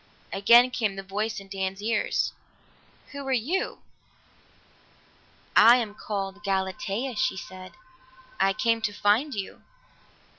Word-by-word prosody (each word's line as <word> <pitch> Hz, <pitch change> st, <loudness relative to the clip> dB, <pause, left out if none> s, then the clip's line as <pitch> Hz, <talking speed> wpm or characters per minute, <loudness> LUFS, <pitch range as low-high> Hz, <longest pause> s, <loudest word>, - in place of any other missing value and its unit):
Again 235 Hz, +6 st, +6 dB
came 215 Hz, -5 st, -1 dB
the 195 Hz, -, -6 dB
voice 210 Hz, +3 st, -3 dB
in 195 Hz, -, -13 dB
Dan's 195 Hz, 0 st, -4 dB
ears. 225 Hz, +3 st, 0 dB, 0.8 s
"Who 280 Hz, -, -7 dB
are -, -, -1 dB
you?" 265 Hz, +10 st, -1 dB, 1.7 s
"I 230 Hz, +3 st, +8 dB
am 230 Hz, -4 st, -1 dB
called 200 Hz, -1 st, -5 dB
Galatea," 195 Hz, +5 st, -2 dB
she 255 Hz, -5 st, 0 dB
said. 185 Hz, +1 st, -9 dB, 0.7 s
"I 195 Hz, -, +3 dB
came 230 Hz, +1 st, +1 dB
to 210 Hz, -1 st, -1 dB
find 220 Hz, +8 st, +1 dB
you." 195 Hz, -2 st, -6 dB
210 Hz, 120 wpm, -26 LUFS, 195-235 Hz, 1.7 s, I